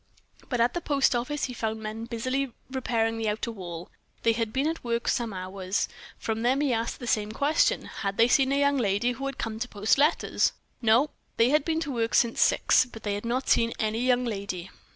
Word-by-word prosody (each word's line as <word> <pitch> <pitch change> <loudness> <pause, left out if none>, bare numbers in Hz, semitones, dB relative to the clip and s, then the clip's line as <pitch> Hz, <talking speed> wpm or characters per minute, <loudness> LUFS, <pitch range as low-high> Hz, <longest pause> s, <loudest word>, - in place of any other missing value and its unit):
But 245 - -1
at 235 +1 +3
the 345 - -2
post 280 -5 +2
office 270 +5 -2
he 250 - -1
found 220 -2 -3
men 220 +1 -5
busily 255 +2 -2 0.2
repairing 225 -4 0
the 220 -1 0
outer 215 +2 -2
wall 175 -5 -8 0.3
they 230 - +4
had 225 -1 -2
been 270 +4 0
at 320 +1 -2
work 235 -1 -2
some 235 -2 0
hours. 185 +1 -2 0.3
From 225 0 -3
them 255 +4 +2
he 280 -4 +2
asked 230 0 -2
the 245 - -6
same 215 -2 0
question 285 +6 +2
"Had 200 -1 -4
they 230 - +6
seen 265 +1 +3
a 280 - +2
young 285 0 +3
lady 210 +2 +1
who 270 +3 -4
had 275 -1 -5
come 220 -1 -4
to 245 - -2
post 210 +5 +1
letters?" 300 +4 +2 0.3
"No." 240 +6 +4 0.3
They 230 +2 +5
had 300 -1 +3
been 320 +1 0
to 290 - -3
work 230 -3 0
since 235 -1 +3
six, - - +4
but 230 -3 -12
they 205 - -1
had 205 +2 -4
not 250 +3 -1
seen 230 0 +3
any 220 +1 -1
young 250 0 +2
lady. 195 -5 -4
235 Hz, 220 wpm, -27 LUFS, 220-265 Hz, 0.3 s, they